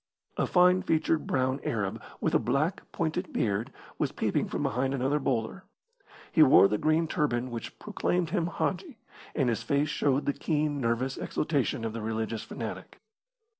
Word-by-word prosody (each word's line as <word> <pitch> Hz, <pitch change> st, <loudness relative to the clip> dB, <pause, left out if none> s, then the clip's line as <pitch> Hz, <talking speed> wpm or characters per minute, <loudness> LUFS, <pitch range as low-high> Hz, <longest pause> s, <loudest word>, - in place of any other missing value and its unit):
A -, -, 0 dB
fine 180 Hz, 0 st, +5 dB
featured 160 Hz, -3 st, +1 dB
brown 130 Hz, +1 st, +1 dB
Arab, 100 Hz, -4 st, -2 dB, 0.2 s
with -, -, 0 dB
a -, -, +5 dB
black, 145 Hz, +8 st, -1 dB
pointed 170 Hz, +3 st, -2 dB
beard, 105 Hz, +1 st, -1 dB, 0.3 s
was -, -, 0 dB
peeping -, -, 0 dB
from -, -, -3 dB
behind 130 Hz, +4 st, 0 dB
another 135 Hz, +3 st, +1 dB
boulder. 130 Hz, +7 st, -2 dB, 0.7 s
He 160 Hz, -, +4 dB
wore 135 Hz, -8 st, +8 dB
the 105 Hz, +1 st, -1 dB
green 155 Hz, +1 st, +2 dB
turban 130 Hz, -7 st, -1 dB
which 115 Hz, -1 st, -6 dB
proclaimed 180 Hz, -5 st, -1 dB
him 170 Hz, -4 st, +1 dB
hadji, 220 Hz, -, -3 dB, 0.4 s
and 135 Hz, -5 st, +2 dB
his 115 Hz, -2 st, 0 dB
face 140 Hz, +6 st, +1 dB
showed 140 Hz, -1 st, +1 dB
the 140 Hz, -, +1 dB
keen, 150 Hz, -2 st, -1 dB
nervous 125 Hz, +3 st, 0 dB
exultation 140 Hz, -6 st, -1 dB
of 110 Hz, -, -3 dB
the 115 Hz, -, -4 dB
religious 110 Hz, 0 st, -2 dB
fanatic. -, -, -7 dB
140 Hz, 165 wpm, -29 LUFS, 115-160 Hz, 0.7 s, wore